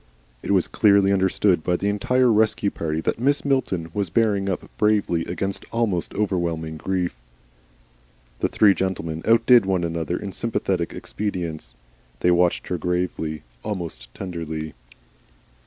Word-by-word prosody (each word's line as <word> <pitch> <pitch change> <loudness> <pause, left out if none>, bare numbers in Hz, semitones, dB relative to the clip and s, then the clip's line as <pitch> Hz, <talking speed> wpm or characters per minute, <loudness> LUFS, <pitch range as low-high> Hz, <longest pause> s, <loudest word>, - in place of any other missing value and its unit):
It - - -7
was 95 -3 +3
clearly 100 -2 +4
understood 95 -2 +2
by 90 - +1
the 100 - -2
entire 125 +5 +2
Rescue 110 -1 +2
Party 80 -1 -2
that - - -1
Mrs. 140 +3 +1
Milton 95 - 0
was 100 -4 0
bearing 100 0 +1
up 95 - -3
bravely 105 -6 +2
against 95 +2 -3
almost 110 -7 -1
overwhelming 85 -6 -1
grief. 90 -3 -2 1.2
The - - +2
three 105 -2 +5
gentlemen 85 -4 -3
outdid 115 +1 +6
one 95 -2 +1
another 85 0 -2
in 100 - -6
sympathetic 95 -5 -1
expedients; 85 - -5 0.5
they 90 - +4
watched 90 0 +2
her 90 - -2
gravely 85 -3 -2 0.2
almost 85 - -5
tenderly. 80 -4 -5
95 Hz, 135 wpm, -23 LUFS, 85-105 Hz, 1.2 s, outdid